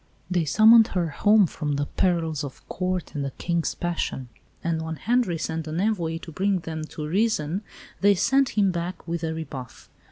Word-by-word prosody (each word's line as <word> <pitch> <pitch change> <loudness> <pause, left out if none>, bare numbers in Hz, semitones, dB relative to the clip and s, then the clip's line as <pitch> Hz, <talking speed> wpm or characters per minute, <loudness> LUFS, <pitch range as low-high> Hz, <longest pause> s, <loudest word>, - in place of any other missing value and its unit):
They 175 -3 +2
summoned 220 +7 +7
her 175 -3 +1
home 205 +7 +4
from 150 -3 -3
the 145 0 0
perils 165 -3 0
of 140 -2 -9
Court 185 -1 -3
and 145 - -2
a 140 - -2
King's 170 +4 -2
passion; 165 -7 -3 0.3
and 165 -1 -1
when 160 0 -4
Henri 230 -2 +1
sent 160 0 -3
an 155 +2 -3
envoy 180 -6 0
to 165 - -8
bring 190 +2 0
them 160 -1 -5
to 155 -1 -7
reason 185 -1 0 0.4
they 200 0 +5
sent 270 +6 +2
him 200 -2 +4
back 175 0 -5
with 170 0 -3
a 160 - -1
rebuff. 135 -6 -8
170 Hz, 185 wpm, -25 LUFS, 160-195 Hz, 0.4 s, summoned